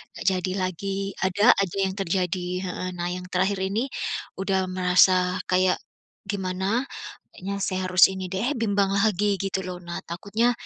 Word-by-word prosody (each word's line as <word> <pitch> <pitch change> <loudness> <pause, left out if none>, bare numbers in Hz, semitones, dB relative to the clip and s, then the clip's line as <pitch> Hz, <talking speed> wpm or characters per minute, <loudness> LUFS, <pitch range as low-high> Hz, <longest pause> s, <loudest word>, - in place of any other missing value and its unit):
nggak - - -7
jadi 185 0 -1
lagi 185 +2 -2 0.3
ada 205 +5 +5
aja 195 -1 -2
yang 190 - -2
terjadi 180 -1 -1 0.2
heeh, 185 0 -4
nah 175 0 -2
yang 180 0 -5
terakhir 190 +2 +1
ini, 210 +8 -1 0.5
udah 190 -1 +1
merasa 180 0 +4 0.2
kayak, 185 0 +4 0.5
gimana 195 +5 -1 0.5
kayaknya 200 +2 -5
saya 185 -1 -1
harus 185 0 +7
ini 190 -1 -4
deh 205 +8 0
bimbang 200 -3 +2
lagi 200 0 +2
gitu 195 0 -1
loh 180 -1 -5
nah 170 0 -5
takutnya, 205 +8 0
190 Hz, 150 wpm, -25 LUFS, 180-200 Hz, 0.5 s, harus